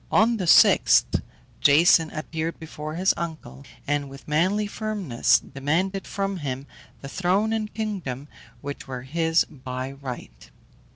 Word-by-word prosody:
On 230 Hz, +2 st, +4 dB
the 185 Hz, -4 st, -3 dB
sixth, -, -, +5 dB, 0.4 s
Jason 160 Hz, +2 st, +5 dB
appeared 160 Hz, +1 st, -4 dB
before 155 Hz, -1 st, -7 dB
his 185 Hz, +3 st, +3 dB
uncle, 160 Hz, -4 st, -6 dB, 0.2 s
and 145 Hz, -1 st, -1 dB
with 135 Hz, 0 st, -13 dB
manly 185 Hz, +8 st, +1 dB
firmness 205 Hz, -, +1 dB
demanded 175 Hz, +8 st, -2 dB
from 195 Hz, -1 st, -2 dB
him 135 Hz, -4 st, -4 dB, 0.4 s
the 135 Hz, -, -7 dB
throne 190 Hz, +8 st, +1 dB
and 215 Hz, -1 st, -2 dB
kingdom 185 Hz, -, -4 dB, 0.3 s
which 145 Hz, -1 st, -7 dB
were 125 Hz, -2 st, -6 dB
his 165 Hz, +4 st, +1 dB
by 130 Hz, -2 st, -6 dB
right. 125 Hz, -, -9 dB
160 Hz, 130 wpm, -25 LUFS, 135-190 Hz, 0.4 s, sixth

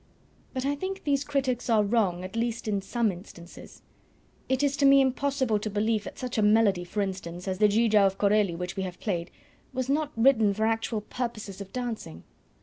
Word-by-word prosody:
But 260 Hz, -1 st, -3 dB
I 285 Hz, -, +1 dB
think 380 Hz, +6 st, -5 dB
these 285 Hz, -1 st, +1 dB
critics 265 Hz, -4 st, -1 dB
are 220 Hz, -2 st, +4 dB
wrong 200 Hz, -5 st, +1 dB
at 185 Hz, +2 st, -7 dB
least 230 Hz, 0 st, -2 dB
in 200 Hz, -2 st, 0 dB
some 225 Hz, +2 st, 0 dB
instances. 175 Hz, -1 st, -12 dB, 0.7 s
It 265 Hz, +1 st, +1 dB
is 280 Hz, -1 st, +2 dB
to 280 Hz, -, +2 dB
me 275 Hz, 0 st, +7 dB
impossible 265 Hz, -3 st, +1 dB
to 215 Hz, -, -4 dB
believe 210 Hz, +1 st, 0 dB
that -, -, -8 dB
such 250 Hz, -3 st, -3 dB
a -, -, +3 dB
melody, 210 Hz, -3 st, +4 dB
for 190 Hz, +4 st, -3 dB
instance, 185 Hz, -2 st, -5 dB
as 190 Hz, 0 st, -2 dB
the 210 Hz, -, +6 dB
Giga 215 Hz, 0 st, +4 dB
of 195 Hz, -, -3 dB
Corelli 205 Hz, -3 st, +2 dB
which 180 Hz, +1 st, -5 dB
we 195 Hz, -, -2 dB
have 185 Hz, -2 st, -5 dB
played, 175 Hz, -4 st, -2 dB, 0.4 s
was 260 Hz, 0 st, -2 dB
not 295 Hz, +1 st, 0 dB
written 225 Hz, -4 st, +4 dB
for 220 Hz, +1 st, 0 dB
actual 225 Hz, -1 st, -1 dB
purposes 215 Hz, -4 st, -5 dB
of 195 Hz, -, -9 dB
dancing. 230 Hz, -, -5 dB
220 Hz, 200 wpm, -27 LUFS, 195-255 Hz, 0.7 s, me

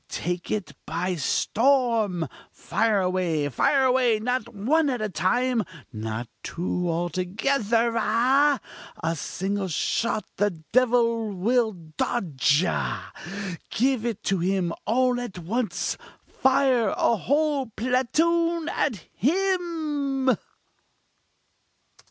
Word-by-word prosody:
take 175 Hz, 0 st, -3 dB
it 185 Hz, -9 st, -2 dB
by 180 Hz, +3 st, -1 dB
storm! 220 Hz, -, +1 dB, 0.2 s
fire 220 Hz, -3 st, +1 dB
away! 180 Hz, -5 st, 0 dB
fire 270 Hz, -, +2 dB
away! 250 Hz, -3 st, +3 dB
not 245 Hz, +1 st, -1 dB
one 280 Hz, +9 st, +2 dB
at 250 Hz, -2 st, -1 dB
a 215 Hz, -, -1 dB
time! 225 Hz, +8 st, +1 dB, 0.3 s
not 110 Hz, +2 st, -4 dB
two 175 Hz, 0 st, -2 dB
together 230 Hz, +4 st, +1 dB
ah! 255 Hz, +6 st, +3 dB, 0.4 s
a 165 Hz, +1 st, 0 dB
single 195 Hz, +4 st, -3 dB
shot 210 Hz, +5 st, -1 dB
the 205 Hz, +1 st, +3 dB, 0.2 s
devil 230 Hz, -3 st, +3 dB
will 225 Hz, +5 st, +1 dB
dodge 160 Hz, -, 0 dB
ah! -, -, -3 dB, 0.6 s
give 255 Hz, 0 st, +1 dB
it 225 Hz, -3 st, -3 dB
to 195 Hz, -2 st, +1 dB
him 180 Hz, -1 st, 0 dB
all 245 Hz, +2 st, +2 dB
at 235 Hz, -7 st, -6 dB
once 215 Hz, +7 st, -2 dB, 0.3 s
fire 260 Hz, -5 st, +2 dB
a 235 Hz, -, +3 dB
whole 285 Hz, -, +1 dB
platoon! 320 Hz, +9 st, +1 dB
at 220 Hz, -, -1 dB
him!!" 300 Hz, -, 0 dB
230 Hz, 105 wpm, -25 LUFS, 185-260 Hz, 0.6 s, away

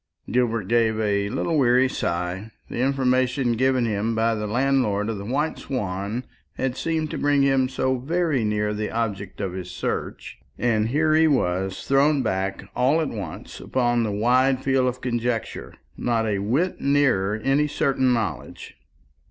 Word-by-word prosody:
Gilbert 115 Hz, -5 st, 0 dB
gave 110 Hz, -1 st, +2 dB
a 100 Hz, -2 st, 0 dB
little 160 Hz, +7 st, 0 dB
weary 125 Hz, 0 st, +4 dB
sigh. 90 Hz, -1 st, -3 dB, 0.2 s
The -, -, -5 dB
information 130 Hz, -1 st, +1 dB
given 130 Hz, +1 st, +2 dB
him 110 Hz, +1 st, -1 dB
by 115 Hz, +1 st, +2 dB
the 105 Hz, -1 st, -3 dB
landlord 120 Hz, -3 st, +1 dB
of 110 Hz, -3 st, -3 dB
the 100 Hz, -, -7 dB
White 145 Hz, +7 st, -1 dB
Swan 105 Hz, -2 st, -3 dB, 0.3 s
had 130 Hz, -1 st, -2 dB
seemed 160 Hz, 0 st, -2 dB
to -, -, -4 dB
bring 145 Hz, -1 st, +3 dB
him 135 Hz, -2 st, +2 dB
so 130 Hz, -1 st, -1 dB
very 155 Hz, -2 st, 0 dB
near 105 Hz, 0 st, 0 dB
the 105 Hz, 0 st, -3 dB
object 105 Hz, -4 st, -3 dB
of 95 Hz, -3 st, -3 dB
his 90 Hz, -1 st, -6 dB
search, -, -, -4 dB, 0.2 s
and 110 Hz, -3 st, +1 dB
here 155 Hz, +4 st, +2 dB
he 160 Hz, +1 st, +5 dB
was 95 Hz, -, 0 dB
thrown 140 Hz, +1 st, +3 dB
back 95 Hz, +1 st, -2 dB
all 130 Hz, +6 st, +3 dB
at 155 Hz, -, -1 dB
once 95 Hz, -8 st, -7 dB
upon 120 Hz, -2 st, 0 dB
the 110 Hz, -2 st, -1 dB
wide 125 Hz, +5 st, +2 dB
field 135 Hz, -1 st, +2 dB
of 125 Hz, 0 st, -3 dB
conjecture, 120 Hz, -2 st, -3 dB, 0.2 s
not 115 Hz, -2 st, 0 dB
a 105 Hz, -3 st, 0 dB
whit 130 Hz, -, 0 dB
nearer 130 Hz, -9 st, +2 dB
any 135 Hz, +7 st, +1 dB
certain 135 Hz, -3 st, +1 dB
knowledge. 115 Hz, -4 st, -4 dB
120 Hz, 160 wpm, -24 LUFS, 105-135 Hz, 0.3 s, he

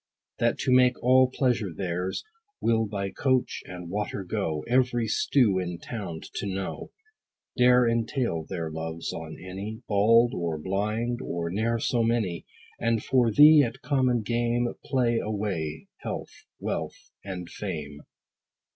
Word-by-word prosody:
That -, -, +2 dB
to -, -, +1 dB
make 125 Hz, -1 st, +5 dB
all 130 Hz, +1 st, +5 dB
pleasure 125 Hz, -7 st, 0 dB
theirs, 90 Hz, +2 st, -3 dB, 0.4 s
Will 115 Hz, -1 st, +2 dB
by 100 Hz, -1 st, -3 dB
coach, 130 Hz, -2 st, 0 dB
and 90 Hz, -1 st, -8 dB
water 100 Hz, +1 st, -3 dB
go, 90 Hz, -5 st, -2 dB
Every 120 Hz, -2 st, +2 dB
stew 110 Hz, -3 st, +3 dB
in 90 Hz, -1 st, -3 dB
town 85 Hz, -4 st, -6 dB, 0.2 s
to 100 Hz, -, -2 dB
know; 95 Hz, -1 st, -4 dB, 0.7 s
Dare 125 Hz, -1 st, +5 dB
entail 115 Hz, -, 0 dB
their 80 Hz, -2 st, -4 dB
loves 80 Hz, +1 st, -4 dB
on 80 Hz, -1 st, -7 dB
any, 95 Hz, +3 st, -6 dB
30 -, -, -42 dB
Bald 115 Hz, +4 st, +4 dB
or 85 Hz, -2 st, -2 dB
blind, 105 Hz, +8 st, -2 dB
or 85 Hz, -1 st, -3 dB
ne'er 115 Hz, +4 st, 0 dB
so 115 Hz, +1 st, 0 dB
many: 115 Hz, -7 st, 0 dB, 0.3 s
And 115 Hz, -2 st, +1 dB
for 125 Hz, -3 st, +3 dB
thee 150 Hz, +7 st, +8 dB
at 115 Hz, -4 st, -3 dB
common 130 Hz, -5 st, +2 dB
game, 120 Hz, +1 st, 0 dB
Play 120 Hz, -4 st, +1 dB
away 95 Hz, -8 st, -3 dB
health, -, -, -7 dB
wealth, -, -, -4 dB
and 90 Hz, -3 st, -6 dB
fame. 75 Hz, -7 st, -6 dB
105 Hz, 140 wpm, -27 LUFS, 90-120 Hz, 0.7 s, thee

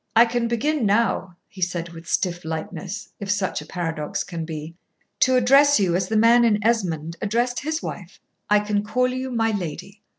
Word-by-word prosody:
"I 230 Hz, +1 st, +8 dB
can 235 Hz, 0 st, -1 dB
begin 270 Hz, +5 st, 0 dB
now," 200 Hz, -4 st, +1 dB
he 195 Hz, -3 st, -13 dB
said 175 Hz, -1 st, -1 dB
with 165 Hz, 0 st, -12 dB
stiff 175 Hz, -2 st, -1 dB
lightness, 165 Hz, +5 st, -5 dB
if 200 Hz, -, -6 dB
such 195 Hz, -5 st, 0 dB
a 150 Hz, -, -12 dB
paradox 165 Hz, +1 st, -3 dB
can 170 Hz, -3 st, -5 dB
be, 160 Hz, 0 st, -6 dB, 0.5 s
"to 260 Hz, -1 st, +4 dB
address 275 Hz, +3 st, +5 dB
you 180 Hz, -4 st, +2 dB
as 185 Hz, 0 st, 0 dB
the 220 Hz, -, 0 dB
man 230 Hz, +2 st, +6 dB
in 220 Hz, -3 st, +4 dB
Esmond 170 Hz, -8 st, 0 dB
addressed 240 Hz, +4 st, 0 dB
his 315 Hz, +2 st, -3 dB
wife. -, -, -7 dB, 0.3 s
I 210 Hz, 0 st, +5 dB
can 210 Hz, 0 st, -1 dB
call 250 Hz, +4 st, +1 dB
you 255 Hz, +1 st, -3 dB
'my 225 Hz, -2 st, +1 dB
lady.'" 195 Hz, +1 st, -5 dB
205 Hz, 190 wpm, -23 LUFS, 175-235 Hz, 0.5 s, I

